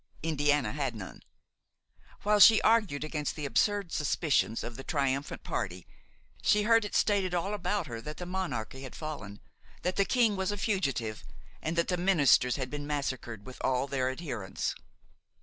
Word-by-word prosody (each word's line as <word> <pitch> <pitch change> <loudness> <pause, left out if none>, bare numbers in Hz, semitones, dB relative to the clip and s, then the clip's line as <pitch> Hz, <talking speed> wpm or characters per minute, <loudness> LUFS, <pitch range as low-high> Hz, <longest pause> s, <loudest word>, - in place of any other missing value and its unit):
Indiana 145 -2 +1
had 135 -5 -2
none. 100 -4 -8 1.0
While 210 0 +3
she 220 +2 +9
argued 210 -11 +3
against 150 -1 -3
the 150 - -4
absurd 200 +5 +1
suspicions 145 -6 +1
of 120 - -6
the 135 - -8
triumphant 140 -2 -1
party, 90 -1 -4 0.6
she 210 0 +3
heard 230 +1 +4
it 205 - -5
stated 195 -4 +2
all 190 +4 -1
about 205 0 -1
her 115 -1 -6
that 150 +5 -7
the 180 - -5
monarchy 175 -9 -4
had 130 - -8
fallen, 140 -11 -6 0.4
that 180 0 -1
the 200 - +5
king 230 -4 +3
was 190 0 -1
a 205 - -3
fugitive, 135 - -1 0.4
and 160 +2 -2
that 170 0 +1
the 180 - +1
ministers 160 -9 +4
had 130 -2 -4
been 145 0 -5
massacred 130 -7 -3
with 130 - -10
all 130 0 +1
their 130 -2 -1
adherents. 130 - -3
150 Hz, 165 wpm, -30 LUFS, 130-190 Hz, 1.0 s, she